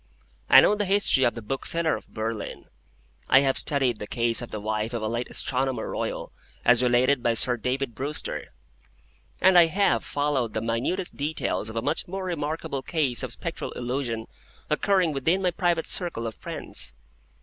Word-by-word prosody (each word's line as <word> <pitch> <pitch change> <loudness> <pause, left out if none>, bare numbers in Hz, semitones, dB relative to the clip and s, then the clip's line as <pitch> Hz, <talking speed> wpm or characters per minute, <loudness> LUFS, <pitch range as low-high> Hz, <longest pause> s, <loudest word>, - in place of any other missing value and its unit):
I - - +10
know - - +4
the 210 0 0
history 195 -9 +3
of 120 - +1
the 115 - -7
Bookseller 160 +7 0
of - - -10
Berlin, 110 0 -5 0.6
I 130 - +7
have 135 -1 +1
studied 135 -6 +1
the 105 - -6
case 115 +1 +2
of 120 - -7
the 105 - -5
wife 110 +2 -2
of 115 - -3
a - - 0
late 120 +2 -3
Astronomer 130 0 -1
Royal - - -4 0.3
as 125 0 +6
related 125 +2 +3
by 120 -1 +1
Sir 125 +1 +3
David 125 +2 -2
Brewster, 140 +5 -3 1.0
and 185 -1 +7
I 170 - +7
have 165 - +1
followed 145 -6 -1
the - - +1
minutest 120 - -2
details 145 -6 -2
of 110 - -8
a 115 - -2
much 150 +4 -1
more 190 +2 -5
remarkable 155 -4 -3
case 140 -5 +1
of - - -3
Spectral - - -5
Illusion 120 -2 -3 0.5
occurring 185 -5 +2
within 160 +7 +1
my 180 - +2
private 170 -1 0
circle 170 -11 -1
of 115 - -4
friends. - - -3
130 Hz, 175 wpm, -26 LUFS, 115-160 Hz, 1.0 s, I